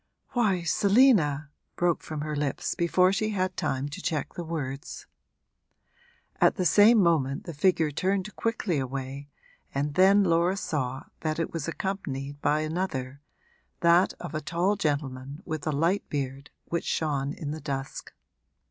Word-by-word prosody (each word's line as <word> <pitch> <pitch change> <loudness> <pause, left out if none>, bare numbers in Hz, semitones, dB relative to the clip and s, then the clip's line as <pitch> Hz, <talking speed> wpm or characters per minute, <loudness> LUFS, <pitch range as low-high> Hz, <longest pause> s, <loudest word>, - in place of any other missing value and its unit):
'Why, 200 -8 +1
Selina!' 185 - +3 0.2
broke 175 -1 +1
from 155 -2 -5
her 150 0 -3
lips 145 -2 -1
before 180 +2 +3
she 215 +2 0
had 185 -3 -1
time 135 +1 -1
to 175 +6 -7
check 155 -6 -2
the 175 - -5
words. 150 -3 -5 1.3
At - - +4
the 185 - -1
same 210 +7 +6
moment 160 -8 +2
the 170 - -7
figure 160 0 +2
turned 190 +6 -1
quickly 215 -8 -1
away, 135 +2 -5 0.5
and 145 +1 -1
then 195 +4 +6
Laura 175 +1 +2
saw 135 -7 -2 0.2
that 155 -1 -2
it 165 - -2
was 165 -3 -3
accompanied 145 -7 -4
by 150 +1 +2
another, 150 -5 -3 0.6
that 170 +2 +5
of 175 -3 -8
a 155 - -2
tall 175 +6 0
gentleman 145 -3 -3
with 155 -2 -4
a - - +2
light 165 +7 0
beard 140 0 -4 0.2
which 170 - -2
shone 145 -3 -1
in 145 -3 -5
the 155 +1 -6
dusk. 135 -1 -5
155 Hz, 150 wpm, -27 LUFS, 140-185 Hz, 1.3 s, same